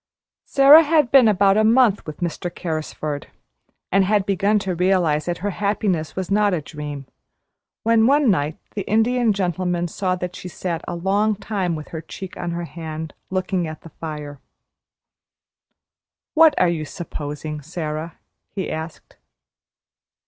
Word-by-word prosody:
Sara 280 +3 +8
had 305 -5 +2
been 265 -4 +7
about 200 -1 +4
a 215 - +4
month 225 -4 +3
with 155 +3 -8
Mr. 175 +1 -2
Carrisford, 155 -4 -4 0.6
and 195 +1 +4
had 200 0 +2
begun 200 +2 +2
to 195 -2 -2
realize 175 -4 +2
that 175 -1 -2
her 205 - 0
happiness 195 -5 -1
was 190 0 -4
not 205 -1 +3
a 160 - -3
dream, 145 -2 -7 0.8
when 225 0 +4
one 280 -3 +4
night 150 -3 -1 0.2
the 205 - -3
Indian 230 +2 +3
Gentleman 180 -2 -1
saw 185 +2 -1
that 180 0 -5
she - - -8
sat 175 -2 -4
a 175 - -3
long 200 +5 +1
time 195 -4 -2
with 155 -1 -8
her 160 - -6
cheek 185 +3 -9
on 175 - -4
her 170 0 -3
hand 160 -1 -7 0.2
looking 185 -2 -1
at 155 -1 -8
the 165 - -12
fire. 150 -3 -7 1.9
"What 320 -1 +6
are 180 - +4
you 170 -2 -1
`supposing,' 150 -1 -6
Sara?" 155 0 -5 0.3
he 190 - -4
asked. 160 +1 -7
180 Hz, 150 wpm, -22 LUFS, 160-205 Hz, 1.9 s, Sara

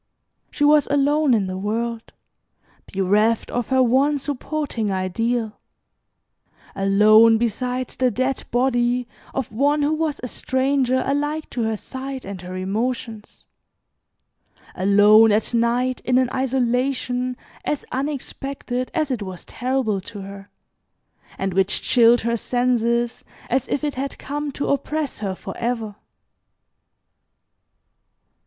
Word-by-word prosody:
She 290 - -2
was 295 0 +5
alone 285 -1 +3
in 205 -3 +1
the 185 0 -4
world, 225 +3 -3 0.8
bereft 210 +4 +1
of 245 -1 -2
her 260 -1 +4
one 270 +4 +3
supporting 280 -4 -3
ideal, 220 +4 -1 1.2
alone 215 +3 +6
beside 250 +2 -2
the 255 -1 +1
dead 255 +3 -1
body 245 0 +1 0.3
of 265 -3 -2
one 285 +6 +2
who 295 +2 +2
was 310 -2 -1
a - - -2
stranger 260 0 0
alike 295 +3 -2
to 245 - -3
her 220 0 0
sight 265 +3 -7
and 195 -2 -7
her 180 0 -7
emotions; 220 +3 -4 1.3
alone 205 +3 +6
at 215 +3 0
night 240 +2 +1
in 250 0 +2
an 255 -1 +2
isolation 255 -1 0 0.3
as 295 - -2
unexpected 270 -2 -4
as 310 -4 0
it 245 -4 -2
was 185 -3 -7
terrible 245 -6 -1
to 205 +2 -9
her, 195 +1 -10 0.9
and 195 -1 -2
which 195 +2 +1
chilled 240 -1 +5
her 235 +1 0
senses 240 0 0 0.3
as 260 +1 +1
if 285 - -2
it 295 -1 -1
had 270 +2 -4
come 290 +1 -4
to 285 - -3
oppress 295 +1 -1
her 195 -3 -3
forever. 230 0 -4
245 Hz, 120 wpm, -22 LUFS, 220-270 Hz, 1.3 s, alone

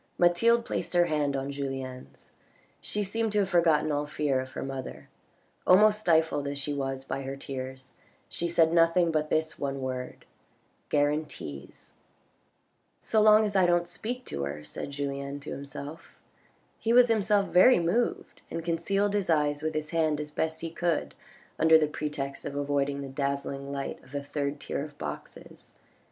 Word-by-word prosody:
Mathilde 230 +7 +4
placed - - -3
her 175 0 +5
hand 150 -3 0
on 135 +1 -3
Julien's; 135 -2 -6 0.5
she 210 - -3
seemed 225 +3 -1
to 210 - +3
have 190 - -1
forgotten 165 -4 +3
all 145 0 -1
fear 145 -3 0
of 130 0 -6
her - - -4
mother. 135 -1 -6 0.6
Almost 210 +3 +6
stifled 160 -6 +2
as 140 0 -3
she 140 +1 -2
was 135 -1 -3
by 135 +1 -3
her 135 0 -5
tears, 130 -1 -7 0.3
she 170 - -3
said 165 -1 +3
nothing 165 0 +4
but 155 -1 0
this 160 0 0
one 140 -1 -2
word: 130 -1 -5 0.3
" - - -41
Guarantees! 145 - -2 0.4
" - - -42
" - - -45 0.3
So 220 - +2
long 215 0 +7
as 205 -1 -3
I 185 -2 +5
don't 175 0 +2
speak 225 +8 -5
to 70 - -4
her," 75 +2 -6
said 75 - -6
Julien 140 0 -4
to 145 - -7
himself. 140 +3 -8 0.6
He 230 - +1
was 245 0 +7
himself 210 -2 +2
very 190 +8 +7
moved, 175 +8 -1
and 165 - -5
concealed 195 +5 0
his 200 -3 -1
eyes 150 -2 +2
with 155 0 -2
his 155 0 -3
hand 155 -3 +1
as 150 0 -5
best 160 +1 -2
he 165 0 -4
could 170 -1 -1 0.5
under 160 0 +7
the 155 - +3
pretext 145 -2 -4
of 140 - -5
avoiding 140 0 0
the 140 - -5
dazzling 140 0 -3
light 140 -1 -5
of 130 - -18
the 140 0 -3
third 145 0 -3
tier 140 - -3
of 145 -1 -10
boxes. - - -8
150 Hz, 175 wpm, -28 LUFS, 140-175 Hz, 0.6 s, long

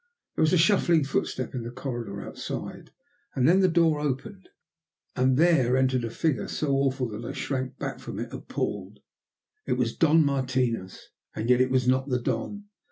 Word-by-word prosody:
There - - -2
was 155 - +4
a 185 - +4
shuffling 170 -3 +4
footstep 130 -2 -2
in 125 - -3
the 115 - -6
corridor 120 -6 -5
outside, - - -6 0.5
and 130 - +3
then 180 +4 +5
the 190 - +5
door 165 -3 +3
opened 150 +8 -4 0.7
and 130 0 +2
there 140 -7 +4
entered 130 -2 +2
a 115 - -2
figure 155 +4 -1
so 150 - -2
awful 135 -2 +1
that 110 +2 -7
I 120 - -5
shrank 130 -1 -3
back - - -5
from - - -7
it - - -5
appalled. - - -4 0.7
It - - +1
was - - -1
Don 160 -1 +4
Martinos, 130 -7 -1 0.3
and 115 +3 0
yet 125 0 +5
it 130 - +2
was 130 -1 +1
not 130 +2 +2
the 125 -1 +1
Don. 130 - -3
130 Hz, 180 wpm, -26 LUFS, 125-155 Hz, 0.7 s, then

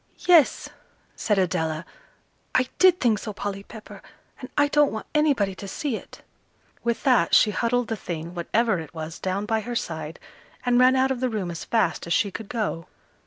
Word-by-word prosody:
"Yes," 340 -5 +5 0.5
said 210 -2 0
Adela, 160 -3 -1 0.7
"I 255 - +3
did 370 -1 +6
think 225 -4 +2
so, 215 - -6
Polly 200 -1 -4
Pepper, 215 +2 -12 0.4
and 255 - -8
I 290 0 +5
don't 295 0 +3
want 220 - -5
anybody 280 -11 +2
to 200 +1 -9
see 265 +5 -3
it." - - -11 0.6
With 235 -1 -1
that 250 - +4
she 215 - +5
huddled 235 +3 0
the 225 - -2
thing, 170 -4 -6
whatever 195 +3 0
it 160 0 -10
was, 160 +1 -6
down 190 +2 -2
by 220 +1 0
her 240 +3 -5
side, 160 -5 -4 0.5
and 245 0 +3
ran 255 +1 +6
out 265 0 +2
of 260 - -2
the 255 0 0
room 200 -6 -3
as 165 - -7
fast 210 -8 0
as 170 - 0
she 200 - +1
could 220 +1 -8
go. 210 -8 -3
215 Hz, 190 wpm, -24 LUFS, 185-250 Hz, 0.7 s, did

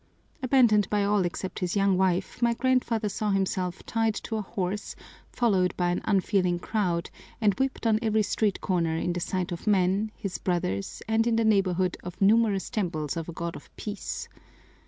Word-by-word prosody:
Abandoned 240 -6 +4
by 205 -1 +1
all 200 -2 +2
except 180 +1 -4
his 180 0 -2
young 195 -1 +3
wife, 185 +3 0
my 235 -1 +3
grandfather 245 -4 +1
saw 210 +1 -2
himself 190 -2 -1
tied 225 -2 0
to 225 - -4
a 215 - -1
horse, 195 0 -4 0.4
followed 195 -7 +1
by 175 -1 +1
an 175 - -1
unfeeling 190 -3 +2
crowd, 175 -3 -1 0.3
and 210 -3 +3
whipped 265 -2 -1
on 220 -1 +3
every 220 -2 +2
street 205 0 0
corner 170 -4 0
in 175 +1 -1
the 175 - -2
sight 180 +1 -2
of 175 +4 -6
men, 200 +1 +2
his 195 -3 -5
brothers, 135 - -2
and 225 +1 +2
in 235 - +2
the 225 0 +2
neighborhood 185 -4 +2
of 180 0 -8
numerous 205 -1 +3
temples 165 - -2
of 165 0 -4
a - - -5
God 170 +1 -4
of - - -11
peace. 210 -1 -5
195 Hz, 180 wpm, -27 LUFS, 180-220 Hz, 0.4 s, Abandoned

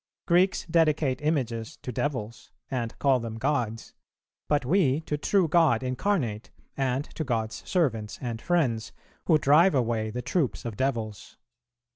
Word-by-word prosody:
Greeks 180 +2 +3
dedicate 155 -5 +2
images 125 -7 -2
to 125 - -4
devils, 115 -4 -4 0.2
and 120 -3 -3
call 135 -3 +3
them 115 -1 -5
gods; 115 -4 -2 0.5
but 145 -3 +1
we 150 -2 +2
to 150 - -3
True 180 +4 +2
God 155 -7 +3
Incarnate, 130 - -1 0.3
and 135 +1 -1
to 160 - -3
God's 115 -5 -2
servants 115 - 0
and 115 -3 -4
friends, 120 -11 0 0.3
who 160 - +6
drive 155 +4 +5
away 115 -3 0
the 125 +3 -5
troops 155 -10 -1
of 115 -3 -4
devils." 115 -5 -3
130 Hz, 140 wpm, -27 LUFS, 115-155 Hz, 0.5 s, who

